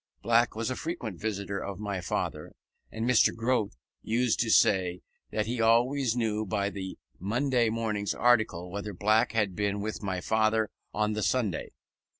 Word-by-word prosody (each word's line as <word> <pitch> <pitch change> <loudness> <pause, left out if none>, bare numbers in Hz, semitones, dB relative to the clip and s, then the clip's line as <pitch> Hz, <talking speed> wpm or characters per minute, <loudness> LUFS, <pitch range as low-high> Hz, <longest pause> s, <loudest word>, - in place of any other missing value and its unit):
Black 120 0 +3
was 115 +3 -2
a - - -2
frequent 125 - -5
visitor 100 -2 -3
of 100 -1 -5
my 100 -3 -3
father, 85 - -3 0.4
and 110 +1 -3
Mr. 125 -2 +4
Grote 115 -2 0 0.3
used 120 +1 +1
to 115 - +1
say 90 -5 +3 0.3
that 105 -1 -1
he 115 +1 -2
always 120 +2 +3
knew 110 -3 0
by 100 0 -1
the 95 -2 -6 0.2
Monday 120 +4 +1
morning's 110 -3 -1
article 110 -7 +2
whether 100 +1 -5
Black 110 +5 +2
had 105 -5 0
been 100 0 -1
with 105 +1 -4
my 95 -3 -2
father 110 +2 +1 0.2
on 105 0 0
the 110 - -2
Sunday. 105 -6 0
110 Hz, 160 wpm, -29 LUFS, 100-115 Hz, 0.4 s, Mr